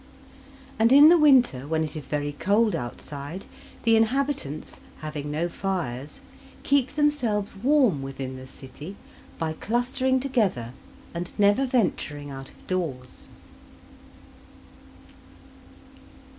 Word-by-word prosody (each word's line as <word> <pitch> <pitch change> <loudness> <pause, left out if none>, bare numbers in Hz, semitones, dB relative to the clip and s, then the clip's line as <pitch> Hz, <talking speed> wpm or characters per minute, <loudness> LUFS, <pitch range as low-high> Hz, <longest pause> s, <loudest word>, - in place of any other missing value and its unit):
And 225 +2 +4
in 290 +3 +9
the 345 - +7
winter, 250 - +4
when 160 +1 0
it 155 0 -5
is 150 -4 -6
very 145 -1 -2
cold 205 +6 +3
outside, 145 +7 -6 0.4
the 230 -1 +5
inhabitants, 225 - -1 0.2
having 150 -1 -5
no 155 +4 -1
fires, 170 - -4 0.4
keep 275 -2 +1
themselves 250 -10 0
warm 245 - +3
within 135 -1 -6
the 130 0 -10
city 145 +8 -10 0.4
by 160 -2 -2
clustering 255 +7 0
together, 210 - 0 0.4
and 170 0 -5
never 205 +6 +4
venturing 150 - -1
out 135 0 -8
of - - -19
doors. 145 -9 -4
185 Hz, 110 wpm, -25 LUFS, -, 0.4 s, in